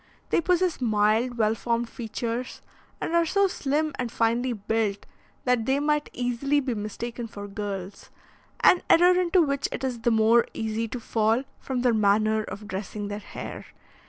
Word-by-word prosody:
They - - +3
possess 360 -2 +1
mild, 220 +2 +2
well 215 -1 +3
formed 235 +1 -1
features, 235 +2 -5 0.4
and - - -3
are 340 0 +4
so 395 +4 +2
slim 300 -3 -1
and 245 -2 -2
finely 235 +3 +1
built, 210 -2 -1 0.4
that 250 -3 +1
they 270 +1 +2
might 300 0 0
easily 250 +4 0
be 260 -3 -2
mistaken 230 +3 -5
for 205 -2 -8
girls; 200 -2 -6 0.5
an 360 - +6
error 360 +2 +6
into 360 0 +3
which 280 -2 -1
it - - -5
is 255 -3 -2
the 235 - +1
more 225 +1 +4
easy 220 0 -2
to 245 +3 -5
fall 225 +2 +1 0.2
from 255 -2 -3
their 245 -2 +4
manner 215 +1 +3
of 210 0 -8
dressing 205 +1 -5
their 205 0 -4
hair. - - -8
235 Hz, 165 wpm, -26 LUFS, 215-270 Hz, 0.5 s, an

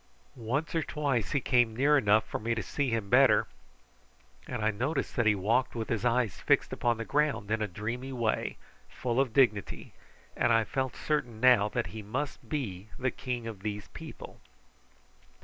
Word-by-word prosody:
Once 130 +6 -2
or 165 - +1
twice 140 -9 -1
he 140 - +2
came 120 -4 +2
near 140 +5 +4
enough 110 -5 +4
for - - -4
me 115 +2 -1
to 110 - -3
see 140 +8 -1
him 115 -3 -1
better, - - +5 1.0
and 120 -4 -3
I 110 - +3
noticed 130 +8 -2
that 120 -2 +2
he 105 - +5
walked 115 +8 +1
with 115 -1 -4
his 115 -1 -1
eyes 120 -5 +1
fixed - - +2
upon 120 -1 0
the 115 - -4
ground 145 -8 0
in 110 0 +1
a 105 - 0
dreamy 115 +8 -5
way, 120 -4 -1 0.3
full 125 0 -2
of 135 -4 -1
dignity, 115 -6 +1 0.4
and 120 - +2
I 115 -1 +4
felt 130 +2 -2
certain 125 -7 -2
now 120 -4 +5
that - - -1
he 110 - -6
must 130 +8 -5
be 105 - -4
the 130 0 0
king 125 -3 -4
of 110 -4 -7
these 105 -1 -5
people. - - -10
120 Hz, 185 wpm, -29 LUFS, 110-130 Hz, 1.0 s, better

